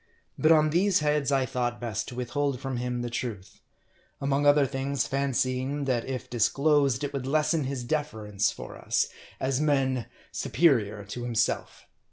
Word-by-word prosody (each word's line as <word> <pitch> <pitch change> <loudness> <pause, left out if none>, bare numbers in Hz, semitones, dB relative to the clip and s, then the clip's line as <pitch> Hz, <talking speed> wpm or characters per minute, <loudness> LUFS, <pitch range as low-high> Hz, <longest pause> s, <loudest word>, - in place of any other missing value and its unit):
But 155 - +3
on 155 -1 +5
these 185 +1 +3
heads 150 -2 +1
I 135 -1 +3
thought 120 -1 -2
best 110 -4 -3
to 125 - -7
withhold 130 +2 -1
from 135 -1 -3
him 125 0 -2
the 120 - -3
truth; 110 -6 -5 0.6
among 140 +1 +1
other 145 -1 +6
things, 135 0 -1
fancying 135 +1 -1
that 125 -3 0
if 130 -2 -4
disclosed, 140 +3 +2
it 145 0 -3
would 135 -2 -3
lessen 155 +1 +2
his 130 -2 -3
deference 110 -8 -1
for - - -8
us, - - +1 0.3
as 130 +1 0
men 135 -5 +1 0.2
superior 110 -11 +2
to 120 +4 -6
him 120 -1 -4
self. 115 0 -1
135 Hz, 165 wpm, -27 LUFS, 120-145 Hz, 0.6 s, other